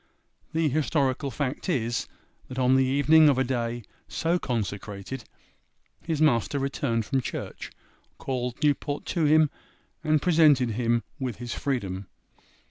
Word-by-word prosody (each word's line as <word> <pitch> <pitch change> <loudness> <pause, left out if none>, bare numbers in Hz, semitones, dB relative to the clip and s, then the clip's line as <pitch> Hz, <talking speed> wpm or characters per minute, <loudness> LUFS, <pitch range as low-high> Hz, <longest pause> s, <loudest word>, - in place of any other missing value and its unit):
The 160 0 +2
historical 140 -2 0
fact 135 - -3
is, 120 -7 0 0.4
that 130 - -8
on 130 0 +4
the 135 - +4
evening 145 +4 +5
of 140 - +2
a 130 - +3
day 120 -2 -2 0.2
so 170 +2 0
consecrated 105 - -4 0.8
his 160 -2 -2
master 140 -3 +2
returned 135 -4 -1
from 135 +2 0
church, - - -6 0.5
called 125 -2 -3
Newport 145 0 0
to 165 -3 +1
him, 155 0 +5 0.5
and 155 -1 +3
presented 150 -7 +4
him 115 +1 +1 0.2
with 130 -4 -3
his 120 +3 -5
freedom. 100 -9 -3
130 Hz, 130 wpm, -26 LUFS, 120-150 Hz, 0.8 s, evening